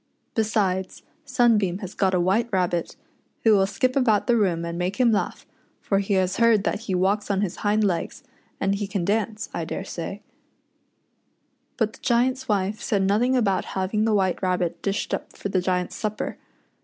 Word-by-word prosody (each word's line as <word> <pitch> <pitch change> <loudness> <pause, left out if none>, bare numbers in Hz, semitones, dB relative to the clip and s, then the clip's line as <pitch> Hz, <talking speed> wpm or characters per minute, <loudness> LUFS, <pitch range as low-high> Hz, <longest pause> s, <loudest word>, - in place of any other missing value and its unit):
Besides, 200 -4 0 0.2
Sunbeam 215 -8 +2
has 195 -1 -7
got 190 -2 +1
a - - +2
White 195 +7 +2
Rabbit, 180 -3 0 0.5
who 225 - +5
will 195 -1 +4
skip 255 +6 0
about 230 -7 +3
the 240 - +3
room 180 -6 +1
and 170 0 -4
make 180 +3 -2
him 250 -3 +3
laugh, 210 - -1 0.3
for 195 - 0
he 200 0 0
has 185 0 +1
heard 230 -3 +4
that 205 - -1
he 205 -4 -3
walks 195 +3 +1
on 200 -1 +1
his 195 -3 -2
hind 210 +1 +1
legs, 190 +7 -1 0.4
and 195 0 +1
he 200 0 -2
can 195 -3 -2
dance, 215 +1 -1
I - - -2
daresay," - - -5 1.6
But 220 -3 0
the - - -15
Giant's 255 +2 +1
wife 205 0 0
said 200 -3 0
nothing 230 +7 +2
about 200 -6 +1
haying 195 +3 0
the 220 -1 +2
White 190 -3 +1
Rabbit 180 -2 -1
dished 200 0 -2
up - - -5
for 200 - -4
the 190 -1 +1
Giant's 180 0 -1
supper. 215 -1 -3
200 Hz, 180 wpm, -24 LUFS, 185-220 Hz, 1.6 s, who